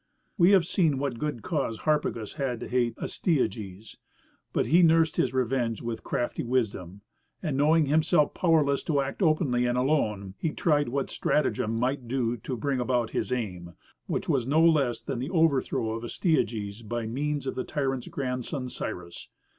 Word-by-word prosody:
We 180 Hz, -2 st, +5 dB
have 185 Hz, -4 st, +5 dB
seen 165 Hz, -5 st, +1 dB
what 135 Hz, -4 st, -2 dB
good 150 Hz, -7 st, -3 dB
cause 140 Hz, -9 st, -2 dB
Harpagus 150 Hz, -8 st, 0 dB
had 130 Hz, -5 st, -2 dB
to -, -, -5 dB
hate 120 Hz, -2 st, 0 dB
Astyages. 110 Hz, -, -2 dB, 0.5 s
But -, -, +1 dB
he 170 Hz, +3 st, +5 dB
nursed 165 Hz, -1 st, +4 dB
his 125 Hz, -, +2 dB
revenge 125 Hz, -3 st, -1 dB
with 115 Hz, -1 st, -4 dB
crafty 120 Hz, -, -2 dB
wisdom, 105 Hz, -7 st, -2 dB, 0.4 s
and 155 Hz, -6 st, -1 dB
knowing 155 Hz, +3 st, +4 dB
himself 155 Hz, +1 st, +3 dB
powerless 155 Hz, -5 st, +2 dB
to 145 Hz, -3 st, +2 dB
act 140 Hz, +8 st, -5 dB
openly 150 Hz, -8 st, +2 dB
and 120 Hz, 0 st, 0 dB
alone, 110 Hz, -8 st, 0 dB
he 160 Hz, -, -1 dB
tried 145 Hz, -5 st, +1 dB
what 135 Hz, +2 st, -2 dB
stratagem 115 Hz, -6 st, 0 dB
might 125 Hz, +1 st, -1 dB
do 120 Hz, -1 st, 0 dB
to 125 Hz, +3 st, -5 dB
bring 135 Hz, +3 st, -1 dB
about 120 Hz, -2 st, 0 dB
his -, -, -2 dB
aim, 90 Hz, -9 st, -4 dB, 0.3 s
which -, -, -2 dB
was 130 Hz, -3 st, +1 dB
no 155 Hz, +4 st, +4 dB
less 140 Hz, -8 st, +3 dB
than 135 Hz, -4 st, -4 dB
the 130 Hz, +4 st, -3 dB
overthrow 150 Hz, -9 st, +1 dB
of 115 Hz, +1 st, -4 dB
Astyages 115 Hz, -, -1 dB
by 115 Hz, +1 st, -4 dB
means 145 Hz, +4 st, -2 dB
of 130 Hz, -, -2 dB
the 130 Hz, -, -3 dB
tyrant's 135 Hz, -3 st, -2 dB
grandson, 125 Hz, 0 st, -3 dB
Cyrus. 90 Hz, -7 st, -6 dB
130 Hz, 170 wpm, -27 LUFS, 115-150 Hz, 0.5 s, We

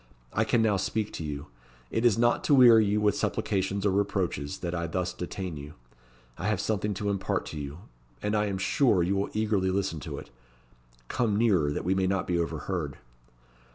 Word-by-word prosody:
"I 110 Hz, -, +2 dB
can 115 Hz, 0 st, +2 dB
now 105 Hz, -3 st, +3 dB
speak 105 Hz, +2 st, -2 dB
to -, -, -5 dB
you. 75 Hz, -1 st, -5 dB, 0.5 s
It 115 Hz, -, 0 dB
is 115 Hz, -4 st, +5 dB
not 120 Hz, +1 st, +2 dB
to 145 Hz, -, +5 dB
weary 120 Hz, -4 st, +8 dB
you 105 Hz, +1 st, +1 dB
with 105 Hz, -1 st, +2 dB
supplications 95 Hz, +1 st, -1 dB
or 100 Hz, -, +4 dB
reproaches 95 Hz, -5 st, -1 dB
that 85 Hz, -1 st, -3 dB
I 85 Hz, -1 st, -2 dB
thus 90 Hz, +2 st, -2 dB
detain 90 Hz, -2 st, -5 dB
you. 75 Hz, +1 st, -9 dB, 0.6 s
I -, -, -2 dB
have 110 Hz, -4 st, +1 dB
something 105 Hz, 0 st, -1 dB
to 100 Hz, +1 st, -1 dB
impart 95 Hz, -1 st, -1 dB
to 75 Hz, -, -4 dB
you, 70 Hz, +4 st, -7 dB, 0.4 s
and 105 Hz, 0 st, -2 dB
I 105 Hz, 0 st, +2 dB
am 100 Hz, -1 st, -2 dB
sure 100 Hz, -, +3 dB
you 95 Hz, +3 st, +1 dB
will 100 Hz, +1 st, -1 dB
eagerly 105 Hz, -3 st, +1 dB
listen 95 Hz, -4 st, -1 dB
to -, -, -6 dB
it. -, -, -10 dB, 0.8 s
Come 115 Hz, -, 0 dB
nearer, 95 Hz, -10 st, +3 dB
that 75 Hz, -, -3 dB
we 90 Hz, -, +2 dB
may 95 Hz, -1 st, +1 dB
not 95 Hz, 0 st, 0 dB
be 85 Hz, -1 st, 0 dB
overheard." 80 Hz, -2 st, -3 dB
95 Hz, 200 wpm, -28 LUFS, 85-105 Hz, 0.8 s, weary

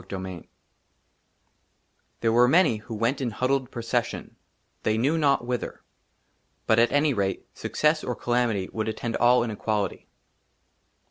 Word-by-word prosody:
17 95 Hz, -2 st, -5 dB
XVII -, -, -20 dB
^ -, -, -42 dB, 1.7 s
THERE 115 Hz, -, +2 dB
WERE 120 Hz, +1 st, +5 dB
MANY 160 Hz, -5 st, +4 dB
WHO 110 Hz, +1 st, -8 dB
WENT 115 Hz, +6 st, 0 dB
IN 125 Hz, -, 0 dB
HUDDLED 130 Hz, +3 st, -1 dB
PROCESSION, 120 Hz, 0 st, -3 dB, 0.5 s
THEY 110 Hz, 0 st, +1 dB
KNEW 145 Hz, +8 st, +1 dB
NOT 140 Hz, -5 st, +2 dB
WHITHER; 125 Hz, 0 st, -4 dB, 0.8 s
BUT, 110 Hz, 0 st, +4 dB
AT 120 Hz, -, +4 dB
ANY 145 Hz, 0 st, +3 dB
RATE, 100 Hz, -4 st, -2 dB
SUCCESS 155 Hz, 0 st, 0 dB
OR 125 Hz, -, -3 dB
CALAMITY 120 Hz, -6 st, 0 dB
WOULD 110 Hz, -1 st, -2 dB
ATTEND 115 Hz, +1 st, -3 dB
ALL 120 Hz, 0 st, +4 dB
IN 115 Hz, -, -3 dB
EQUALITY. 105 Hz, -2 st, -2 dB
120 Hz, 145 wpm, -26 LUFS, 110-130 Hz, 1.7 s, WERE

